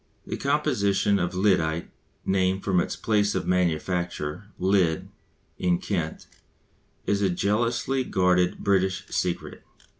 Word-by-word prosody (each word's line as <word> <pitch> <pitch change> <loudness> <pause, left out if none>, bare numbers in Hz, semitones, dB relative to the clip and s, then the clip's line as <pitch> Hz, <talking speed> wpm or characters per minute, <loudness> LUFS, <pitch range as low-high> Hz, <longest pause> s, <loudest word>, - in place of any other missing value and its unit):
The - - -4
composition 120 -9 +1
of 90 +1 -2
lyddite 85 -4 +1 0.3
(named 95 0 +1
from 95 -3 +2
its - - -1
place 105 -1 +1
of - - -1
manufacture, 90 -1 -1
Lydd, 90 -4 +1 0.5
in 90 -1 +2
Kent) 85 -5 -3 0.8
is 100 0 +1
a 100 - +3
jealously 115 +8 0
guarded 90 -4 +2
British 95 -2 +1
secret. 90 -1 -2
95 Hz, 115 wpm, -26 LUFS, 90-100 Hz, 0.8 s, a